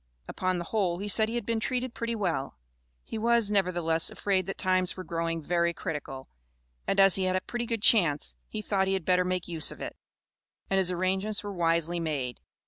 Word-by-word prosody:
Upon 185 Hz, -1 st, -1 dB
the 175 Hz, -, -3 dB
whole 180 Hz, -2 st, 0 dB
he 200 Hz, +3 st, -5 dB
said 220 Hz, +2 st, +4 dB
he 230 Hz, -, -4 dB
had 240 Hz, -, -2 dB
been 230 Hz, 0 st, 0 dB
treated 250 Hz, +1 st, -2 dB
pretty 230 Hz, 0 st, -3 dB
well. 165 Hz, -, -2 dB, 0.5 s
He 220 Hz, -, -6 dB
was, 230 Hz, -2 st, +3 dB
nevertheless, 175 Hz, -5 st, +2 dB
afraid 190 Hz, -2 st, -1 dB
that 195 Hz, -, -4 dB
times 185 Hz, -1 st, +1 dB
were 185 Hz, -, -5 dB
growing 165 Hz, -2 st, -3 dB
"very 170 Hz, +1 st, +1 dB
critical," 135 Hz, -4 st, -5 dB, 0.6 s
and 195 Hz, -, +1 dB
as 195 Hz, -1 st, +7 dB
he 190 Hz, -, 0 dB
had 185 Hz, 0 st, +1 dB
a 185 Hz, -, +1 dB
pretty 240 Hz, +4 st, -4 dB
good 225 Hz, -2 st, -3 dB
chance, 165 Hz, -10 st, +4 dB, 0.2 s
he 215 Hz, -1 st, -5 dB
thought 195 Hz, -2 st, +1 dB
he 190 Hz, -, +1 dB
had 190 Hz, -4 st, -2 dB
better 180 Hz, 0 st, +3 dB
make 180 Hz, -1 st, -2 dB
use 165 Hz, -3 st, +1 dB
of -, -, -10 dB
it, -, -, -6 dB, 0.8 s
and 195 Hz, -, +3 dB
his 185 Hz, -2 st, +1 dB
arrangements 190 Hz, +4 st, 0 dB
were 205 Hz, -1 st, -5 dB
wisely 170 Hz, -1 st, +1 dB
made. 140 Hz, -7 st, -3 dB
185 Hz, 210 wpm, -28 LUFS, 170-205 Hz, 0.8 s, as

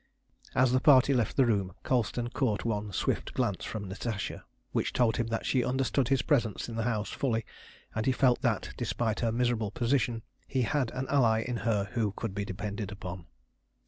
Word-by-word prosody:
As 125 Hz, -1 st, +4 dB
the 130 Hz, -, +4 dB
party 140 Hz, -1 st, +6 dB
left 120 Hz, -4 st, 0 dB
the 135 Hz, -, +6 dB
room 100 Hz, -6 st, 0 dB
Colston 120 Hz, -1 st, 0 dB
caught 120 Hz, -7 st, 0 dB
one 105 Hz, -2 st, -1 dB
swift -, -, -1 dB
glance -, -, 0 dB
from 105 Hz, -3 st, -5 dB
Natasha 100 Hz, +2 st, -4 dB, 0.3 s
which -, -, -1 dB
told 115 Hz, -4 st, +2 dB
him 120 Hz, -, 0 dB
that 115 Hz, -1 st, -2 dB
she 130 Hz, -2 st, +2 dB
understood 130 Hz, 0 st, +1 dB
his 135 Hz, 0 st, +2 dB
presence 120 Hz, -9 st, +1 dB
in 115 Hz, -, -6 dB
the 115 Hz, -1 st, -1 dB
house 105 Hz, -3 st, -2 dB
fully, 115 Hz, -5 st, -1 dB, 0.5 s
and 110 Hz, +2 st, -2 dB
he -, -, +5 dB
felt 125 Hz, -1 st, +3 dB
that, -, -, 0 dB
despite 110 Hz, -3 st, -1 dB
her 115 Hz, -2 st, +1 dB
miserable 120 Hz, -2 st, +1 dB
position, 120 Hz, +1 st, 0 dB, 0.2 s
he 130 Hz, -2 st, 0 dB
had 130 Hz, +1 st, 0 dB
an 130 Hz, +1 st, -2 dB
ally 115 Hz, -6 st, +3 dB
in 125 Hz, 0 st, -3 dB
her 105 Hz, -4 st, 0 dB
who 110 Hz, -5 st, 0 dB
could 110 Hz, -2 st, -4 dB
be 100 Hz, +1 st, -2 dB
depended 100 Hz, +2 st, -4 dB
upon. 90 Hz, -4 st, -7 dB
115 Hz, 190 wpm, -30 LUFS, 105-125 Hz, 0.5 s, party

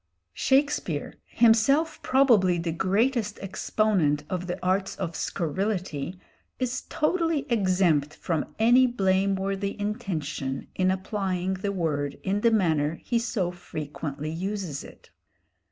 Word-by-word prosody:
Shakespeare, 265 Hz, -, +1 dB
himself 240 Hz, +8 st, +3 dB
probably 230 Hz, -10 st, +4 dB
the 165 Hz, 0 st, -2 dB
greatest 210 Hz, +5 st, +1 dB
exponent 190 Hz, -6 st, +1 dB
of 180 Hz, -1 st, -2 dB
the 180 Hz, -, -3 dB
arts 190 Hz, +1 st, +1 dB
of 170 Hz, -4 st, -4 dB
scurrility, 180 Hz, -2 st, -2 dB, 0.4 s
is 255 Hz, -1 st, -2 dB
totally 325 Hz, -1 st, +1 dB
exempt 185 Hz, -9 st, +2 dB
from 165 Hz, -3 st, -3 dB
any 245 Hz, +3 st, +5 dB
blameworthy 195 Hz, -2 st, 0 dB
intention 160 Hz, -, -3 dB
in 185 Hz, 0 st, +1 dB
applying 190 Hz, -1 st, -1 dB
the 195 Hz, +2 st, -2 dB
word 145 Hz, -6 st, -1 dB
in 200 Hz, +2 st, 0 dB
the 230 Hz, -, +5 dB
manner 160 Hz, -8 st, +2 dB
he 235 Hz, -1 st, +1 dB
so 215 Hz, -6 st, -1 dB
frequently 150 Hz, -3 st, -6 dB
uses 185 Hz, -3 st, -4 dB
it. -, -, -15 dB
190 Hz, 115 wpm, -26 LUFS, 165-220 Hz, 0.4 s, any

